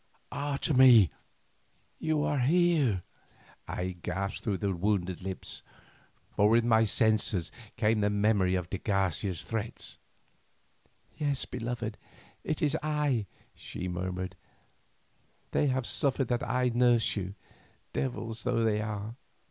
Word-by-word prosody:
"Otomie! 130 Hz, -, +5 dB, 0.9 s
you 155 Hz, -2 st, +1 dB
here!" 145 Hz, -, +3 dB, 0.6 s
I 90 Hz, 0 st, -3 dB
gasped 95 Hz, +3 st, -3 dB
through 100 Hz, -3 st, 0 dB
my 100 Hz, -, 0 dB
wounded 95 Hz, -1 st, -1 dB
lips, 95 Hz, -1 st, -4 dB, 0.7 s
for 105 Hz, +1 st, +4 dB
with 115 Hz, +1 st, +4 dB
my 115 Hz, -1 st, +4 dB
senses 110 Hz, -4 st, +2 dB, 0.3 s
came 110 Hz, -1 st, +2 dB
the 105 Hz, -, +3 dB
memory 100 Hz, -3 st, +2 dB
of 90 Hz, -2 st, -2 dB
de 95 Hz, -, -2 dB
Garcia's 95 Hz, -3 st, 0 dB
threats. 110 Hz, 0 st, -5 dB, 1.2 s
"Yes, 145 Hz, -3 st, 0 dB
beloved, 115 Hz, -2 st, -4 dB, 0.4 s
it 155 Hz, +2 st, -2 dB
is 150 Hz, 0 st, +2 dB
I," 150 Hz, -8 st, 0 dB, 0.3 s
she 90 Hz, -, -6 dB
murmured; 90 Hz, +1 st, -3 dB, 1.2 s
"they 145 Hz, -, +2 dB
have 130 Hz, -2 st, 0 dB
suffered 135 Hz, -1 st, +1 dB
that 120 Hz, -1 st, -1 dB
I 125 Hz, 0 st, +2 dB
nurse 120 Hz, -1 st, +3 dB
you, 95 Hz, -1 st, -4 dB, 0.6 s
devils 115 Hz, -3 st, -3 dB
though 120 Hz, -2 st, +1 dB
they 105 Hz, -1 st, +2 dB
are. 105 Hz, 0 st, -4 dB
110 Hz, 115 wpm, -30 LUFS, 95-125 Hz, 1.2 s, Otomie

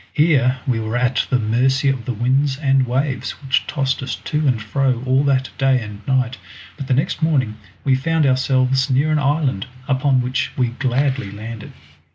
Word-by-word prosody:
Here 140 Hz, -5 st, +3 dB
we 125 Hz, -5 st, 0 dB
were 110 Hz, +2 st, -2 dB
at 125 Hz, -1 st, +1 dB
the 130 Hz, -, +3 dB
mercy 125 Hz, +5 st, +1 dB
of 130 Hz, -4 st, 0 dB
the 125 Hz, -, -2 dB
winds 130 Hz, +4 st, +1 dB
and 135 Hz, -3 st, +2 dB
waves, 130 Hz, +2 st, -1 dB
which 135 Hz, +3 st, 0 dB
tossed 135 Hz, -2 st, -1 dB
us 130 Hz, -, -3 dB
to 150 Hz, 0 st, -2 dB
and 125 Hz, -4 st, +2 dB
fro 125 Hz, +3 st, -1 dB
all 130 Hz, +2 st, +2 dB
that 130 Hz, -2 st, +1 dB
day 135 Hz, -1 st, +3 dB
and 105 Hz, -3 st, -8 dB
night, 130 Hz, -2 st, 0 dB, 0.4 s
but 140 Hz, -3 st, -7 dB
the 130 Hz, -, +2 dB
next 160 Hz, +5 st, -1 dB
morning 130 Hz, -9 st, +1 dB, 0.3 s
we 135 Hz, -, +2 dB
found 160 Hz, +4 st, +1 dB
ourselves 130 Hz, 0 st, +2 dB
near 140 Hz, +4 st, +2 dB
an 155 Hz, -, +2 dB
island, 140 Hz, -6 st, 0 dB, 0.2 s
upon 130 Hz, -1 st, +2 dB
which 125 Hz, +1 st, -2 dB
we 125 Hz, -2 st, +1 dB
gladly 130 Hz, -1 st, -1 dB
landed. 110 Hz, +2 st, -8 dB
130 Hz, 185 wpm, -20 LUFS, 125-140 Hz, 0.4 s, Here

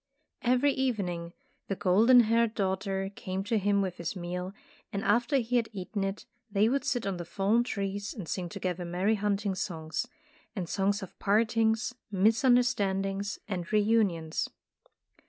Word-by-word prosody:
Every 255 Hz, +3 st, +3 dB
evening 190 Hz, -11 st, -2 dB, 0.4 s
the 195 Hz, -, -1 dB
golden 225 Hz, +8 st, +6 dB
haired 230 Hz, 0 st, +2 dB
daughter 195 Hz, 0 st, -1 dB
came 190 Hz, 0 st, -4 dB
to 220 Hz, +2 st, +1 dB
him 200 Hz, 0 st, +2 dB
with 185 Hz, -1 st, -4 dB
his 170 Hz, +3 st, -4 dB
meal, 180 Hz, +1 st, -4 dB, 0.4 s
and 200 Hz, -, -3 dB
after 240 Hz, +7 st, +3 dB
he 245 Hz, 0 st, +1 dB
had 230 Hz, -2 st, 0 dB
eaten 195 Hz, +1 st, -3 dB
it, 195 Hz, +1 st, -3 dB, 0.2 s
they 205 Hz, +1 st, +3 dB
would 275 Hz, +1 st, 0 dB
sit 245 Hz, -, -1 dB
on 195 Hz, -2 st, -2 dB
the 175 Hz, -, -4 dB
fallen 200 Hz, +7 st, +1 dB
trees, 200 Hz, -3 st, -3 dB
and 195 Hz, -8 st, -7 dB
sing 180 Hz, 0 st, -3 dB
together 180 Hz, +1 st, -3 dB
merry 180 Hz, +5 st, +1 dB
hunting 205 Hz, -1 st, 0 dB
songs, 165 Hz, +3 st, -3 dB, 0.5 s
and 185 Hz, -4 st, -3 dB
songs 200 Hz, +2 st, 0 dB
of 190 Hz, -, -11 dB
part 215 Hz, +3 st, +2 dB
ings, 225 Hz, +1 st, +2 dB, 0.2 s
misunderstandings, 205 Hz, -2 st, +2 dB
and 180 Hz, -4 st, -4 dB
reunions. 205 Hz, -7 st, +1 dB
200 Hz, 155 wpm, -29 LUFS, 185-225 Hz, 0.5 s, golden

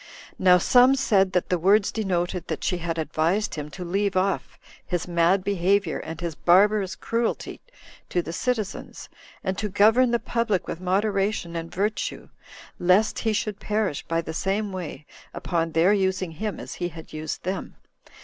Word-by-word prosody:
Now 180 Hz, -1 st, +6 dB
some 250 Hz, +7 st, +5 dB
said 200 Hz, -8 st, +2 dB
that 180 Hz, -, 0 dB
the 180 Hz, -, +1 dB
words 200 Hz, +4 st, +4 dB
denoted 180 Hz, -4 st, -2 dB
that -, -, -4 dB
she 180 Hz, -3 st, 0 dB
had 165 Hz, -1 st, -3 dB
advised 165 Hz, +6 st, 0 dB
him 150 Hz, -1 st, -5 dB
to 180 Hz, +3 st, -7 dB
leave 195 Hz, +2 st, 0 dB
off 160 Hz, -10 st, -1 dB, 0.3 s
his 175 Hz, -1 st, -3 dB
mad 175 Hz, +2 st, +2 dB
behavior 195 Hz, -2 st, +1 dB
and 160 Hz, -1 st, -7 dB
his 170 Hz, -2 st, -3 dB
barbarous 190 Hz, +3 st, +3 dB
cruelty 230 Hz, +4 st, -2 dB, 0.5 s
to 175 Hz, -, 0 dB
the 165 Hz, -, -6 dB
citizens, 220 Hz, -1 st, -3 dB, 0.3 s
and 190 Hz, +1 st, -2 dB
to 210 Hz, -, -2 dB
govern 220 Hz, +6 st, +4 dB
the 235 Hz, -, +2 dB
public 230 Hz, -5 st, -1 dB
with 170 Hz, -, -5 dB
moderation 195 Hz, -1 st, 0 dB
and 165 Hz, 0 st, -5 dB
virtue, 210 Hz, +3 st, -2 dB, 0.5 s
lest 185 Hz, +5 st, +3 dB
he 225 Hz, -, 0 dB
should 215 Hz, -2 st, -2 dB
perish 210 Hz, -8 st, -1 dB
by 165 Hz, 0 st, 0 dB
the 160 Hz, -1 st, -6 dB
same 195 Hz, +4 st, -1 dB
way, 175 Hz, -5 st, -6 dB, 0.3 s
upon 165 Hz, -2 st, -1 dB
their 170 Hz, +5 st, +4 dB
using 190 Hz, -3 st, 0 dB
him 210 Hz, +6 st, -4 dB
as -, -, -7 dB
he 175 Hz, -, +1 dB
had 160 Hz, -1 st, -12 dB
used 155 Hz, 0 st, -5 dB
them. 185 Hz, +1 st, -4 dB
190 Hz, 170 wpm, -25 LUFS, 170-210 Hz, 0.5 s, Now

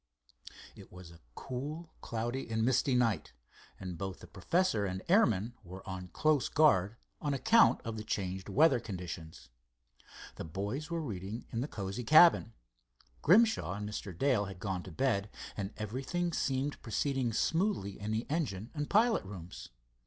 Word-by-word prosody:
It -, -, -14 dB
was 90 Hz, -1 st, -11 dB
a 85 Hz, -, -15 dB, 0.2 s
cool, 150 Hz, +6 st, -6 dB
cloudy 120 Hz, +3 st, -3 dB
and 110 Hz, 0 st, 0 dB
misty 130 Hz, +1 st, +2 dB
night, 115 Hz, -8 st, +1 dB, 0.5 s
and 90 Hz, -3 st, -6 dB
both 95 Hz, -2 st, -4 dB
the -, -, -11 dB
professor 115 Hz, -, 0 dB
and 95 Hz, 0 st, -4 dB
airman 120 Hz, -, +3 dB
were 95 Hz, +2 st, -10 dB
on 95 Hz, -1 st, -5 dB
close 150 Hz, -, +1 dB
guard 105 Hz, -, +4 dB, 0.3 s
on 145 Hz, -2 st, 0 dB
account 225 Hz, +10 st, +5 dB
of 115 Hz, -1 st, -4 dB
the 110 Hz, -, -5 dB
changed 95 Hz, -3 st, -3 dB
weather 145 Hz, -4 st, +5 dB
conditions. 90 Hz, -, -7 dB, 0.9 s
The -, -, -5 dB
boys 100 Hz, -, -4 dB
were 170 Hz, -1 st, -2 dB
reading 105 Hz, -2 st, -5 dB
in 115 Hz, -, -2 dB
the 135 Hz, -, -2 dB
cozy 100 Hz, -1 st, -5 dB
cabin. 155 Hz, -3 st, +6 dB, 0.7 s
Grimshaw 215 Hz, -, +4 dB
and 105 Hz, +1 st, -5 dB
Mr. 105 Hz, -2 st, -5 dB
Dale 125 Hz, -3 st, +2 dB
had 95 Hz, -2 st, -8 dB
gone 95 Hz, -2 st, -3 dB
to 90 Hz, -, -10 dB
bed, 105 Hz, 0 st, 0 dB, 0.3 s
and 100 Hz, -1 st, -4 dB
everything 135 Hz, -, -2 dB
seemed 135 Hz, 0 st, -1 dB
proceeding 130 Hz, +1 st, -1 dB
smoothly 165 Hz, -, 0 dB
in 105 Hz, +1 st, -2 dB
engine 125 Hz, -, -3 dB
and 150 Hz, -2 st, -3 dB
pilot 225 Hz, +3 st, +3 dB
rooms. 95 Hz, -3 st, -9 dB
115 Hz, 150 wpm, -32 LUFS, 95-145 Hz, 0.9 s, cabin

